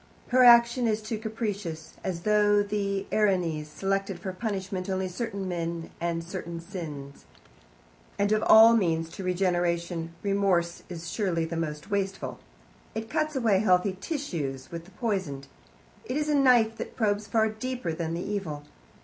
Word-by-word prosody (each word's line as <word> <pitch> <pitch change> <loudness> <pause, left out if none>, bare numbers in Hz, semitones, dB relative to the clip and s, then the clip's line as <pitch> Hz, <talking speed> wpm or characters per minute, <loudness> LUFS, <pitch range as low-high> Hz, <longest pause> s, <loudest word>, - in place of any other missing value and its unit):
Her 255 0 +5
action 235 0 +7
is 215 -1 +1
too 215 0 -4
capricious, 205 -8 -4
as 175 -3 -3
though 205 0 +4
the 200 -1 -2
Erinyes 180 -7 +1
selected 195 +3 -2
for 185 +2 -5
punishment 190 -2 -3
only 190 0 -1
certain 200 +1 -4
men 170 -2 -3
and 170 -1 -1
certain 170 -1 -6
sins. 155 -6 -8 0.9
And 200 +1 +1
of 215 0 +3
all 225 +1 +9
means 165 -6 +1
to 190 - -8
regeneration 175 -2 0
Remorse 195 -4 +1
is 170 -1 -6
surely 175 -6 0
the 165 +1 -5
most 155 +2 -4
wasteful. 195 -1 -2 0.6
It 220 0 -5
cuts 310 +2 0
away 225 -7 +3
healthy 185 -1 +3
tissues 160 - -4
with 170 -1 -6
the - - -16
poisoned. 190 - -2 0.6
It 255 - -2
is 300 0 -1
a - - +3
knife 245 -5 +4
that - - -6
probes 205 -2 0
far 220 +1 +2
deeper 220 -5 -4
than 165 0 -3
the 175 - -3
evil. 190 -8 -3
195 Hz, 155 wpm, -27 LUFS, 170-215 Hz, 0.9 s, all